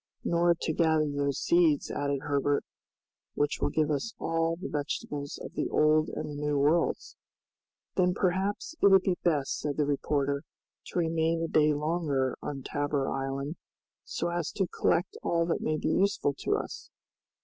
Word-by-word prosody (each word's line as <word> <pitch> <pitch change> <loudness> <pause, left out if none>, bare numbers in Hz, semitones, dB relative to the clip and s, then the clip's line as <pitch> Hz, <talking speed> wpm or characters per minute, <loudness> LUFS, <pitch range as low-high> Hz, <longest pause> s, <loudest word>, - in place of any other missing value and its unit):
"Nor 170 0 +3
to 160 - 0
gather 160 -2 +3
those 145 -1 -1
seeds," 165 -4 +3
added 140 -1 -1
Herbert, 145 0 +1 0.7
"which 145 0 0
will - - +2
give 155 -1 +1
us 185 +10 -2
all 165 0 0
the 185 +4 -6
vegetables 145 -1 -4
of - - -8
the - - -2
Old 155 0 +3
and - - -4
the 150 - -6
New 150 -1 +1
Worlds." 150 +4 +1 0.8
"Then 180 -1 +2
perhaps 190 - 0
it - - +7
would 195 -1 +6
be 185 -2 0
best," 150 -6 +1
said 145 -2 -3
the 150 - +2
reporter, 140 0 0 0.5
"to - - -6
remain 165 0 +1
a - - 0
day 155 -1 +4
longer 150 -4 0
on 135 -2 -5
Tabor 145 -1 -1
Island, 135 +3 -3 0.5
so 170 - -3
as 170 -3 -2
to 195 - +1
collect 175 0 0
all 170 0 +1
that 165 - -1
may 155 - 0
be - - -1
useful 195 -7 +2
to - - -1
us." - - -5
155 Hz, 170 wpm, -29 LUFS, 145-170 Hz, 0.8 s, it